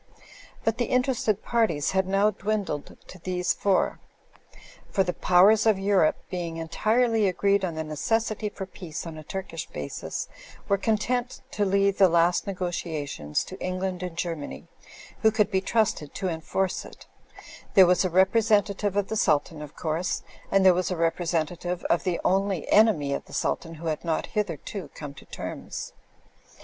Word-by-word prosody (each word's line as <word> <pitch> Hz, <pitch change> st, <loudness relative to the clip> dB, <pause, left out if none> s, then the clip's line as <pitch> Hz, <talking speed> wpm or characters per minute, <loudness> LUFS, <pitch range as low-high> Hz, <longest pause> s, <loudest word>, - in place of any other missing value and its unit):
But 225 Hz, +1 st, 0 dB
the 240 Hz, -, +2 dB
interested 250 Hz, -5 st, +1 dB
parties 215 Hz, -11 st, +1 dB
had 190 Hz, 0 st, +1 dB
now 200 Hz, +2 st, +3 dB
dwindled 205 Hz, -7 st, -3 dB
to 185 Hz, -, -12 dB
these 180 Hz, +1 st, 0 dB
four. 195 Hz, -2 st, +1 dB, 0.9 s
For 195 Hz, -, +2 dB
the 180 Hz, -1 st, -2 dB
Powers 200 Hz, +5 st, +5 dB
of 215 Hz, -3 st, +4 dB
Europe 195 Hz, -4 st, +3 dB, 0.2 s
being 170 Hz, -3 st, -3 dB
entirely 220 Hz, +6 st, +2 dB
agreed 200 Hz, +1 st, +2 dB
on 170 Hz, -3 st, -2 dB
the 160 Hz, -, -2 dB
necessity 215 Hz, +8 st, -1 dB
for 195 Hz, -1 st, -6 dB
peace 180 Hz, -4 st, -7 dB
on 165 Hz, -1 st, -7 dB
a 155 Hz, -, -9 dB
Turkish 165 Hz, -1 st, -5 dB
basis, 70 Hz, -1 st, -5 dB, 0.4 s
were 200 Hz, -1 st, +2 dB
content 235 Hz, +4 st, -1 dB
to 205 Hz, -, 0 dB
leave 200 Hz, 0 st, +2 dB
the 190 Hz, -2 st, +7 dB
last 170 Hz, +2 st, +3 dB
negotiations 160 Hz, -, -3 dB
to 185 Hz, -, -10 dB
England 185 Hz, 0 st, -2 dB
and 180 Hz, -2 st, -5 dB
Germany, 165 Hz, -5 st, -4 dB, 0.6 s
who 220 Hz, -, +6 dB
could 215 Hz, -1 st, +1 dB
be 190 Hz, -, +2 dB
trusted 200 Hz, -8 st, 0 dB
to 190 Hz, -2 st, -1 dB
enforce 175 Hz, +3 st, -2 dB
it; -, -, -13 dB, 0.7 s
there 190 Hz, -, +9 dB
was 180 Hz, +2 st, +3 dB
a 185 Hz, -, +1 dB
representative 205 Hz, +1 st, +2 dB
of 205 Hz, -1 st, +1 dB
the 220 Hz, -, -3 dB
Sultan, 155 Hz, -6 st, +1 dB
of 150 Hz, 0 st, -9 dB
course; 165 Hz, +2 st, -2 dB, 0.3 s
and 195 Hz, -1 st, +3 dB
there 185 Hz, -, +8 dB
was 180 Hz, +1 st, 0 dB
a 180 Hz, -, -2 dB
representative 170 Hz, +1 st, -1 dB
of 170 Hz, -, +1 dB
the 180 Hz, -2 st, 0 dB
only 195 Hz, -3 st, +1 dB
enemy 195 Hz, -11 st, +4 dB
of -, -, -4 dB
the -, -, -15 dB
Sultan 165 Hz, -1 st, -2 dB
who 165 Hz, +2 st, -10 dB
had 155 Hz, -2 st, -2 dB
not 165 Hz, -2 st, -1 dB
hitherto 190 Hz, -3 st, -4 dB
come 145 Hz, -2 st, -7 dB
to -, -, -14 dB
terms. -, -, -6 dB
185 Hz, 165 wpm, -26 LUFS, 165-205 Hz, 0.9 s, there